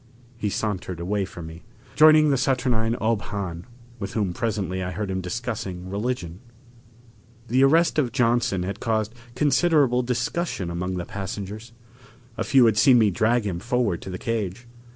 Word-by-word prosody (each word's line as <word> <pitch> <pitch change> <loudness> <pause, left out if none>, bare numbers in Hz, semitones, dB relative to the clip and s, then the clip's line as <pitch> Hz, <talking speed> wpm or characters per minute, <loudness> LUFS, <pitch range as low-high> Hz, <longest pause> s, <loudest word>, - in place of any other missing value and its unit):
He 105 -2 -2
sauntered 95 -4 -3
away 95 +3 -1
from 85 -3 -9
me, 80 +2 -10 0.3
joining 155 -1 +7
the - - +3
saturnine 125 -4 +1
Ob 110 -1 +1
Hahn, 95 -3 -5 0.3
with 100 -1 -5
whom 100 -5 -1
presently 95 -4 -2
I 90 - -3
heard 95 +2 -4
him 95 0 -2
discussing 95 -2 -5
religion. 100 -5 -3 1.1
The 130 +2 +4
arrest 160 +3 +4
of 125 -5 +1
Johnson 120 -6 +1
had 100 +3 -4
caused 110 -1 -1 0.2
considerable 145 -2 +3
discussion 125 - -2
among 90 +2 -3
the 90 - -4
passengers. 100 +3 -6 0.6
A - - -2
few 130 -3 +5
had 110 -2 +3
seen 130 +1 +6
me 110 -3 +4
drag 110 +4 +1
him 90 -4 -2
forward 120 -5 0
to - - -8
the 90 - -4
cage. 110 0 -3
110 Hz, 160 wpm, -24 LUFS, 95-125 Hz, 1.1 s, joining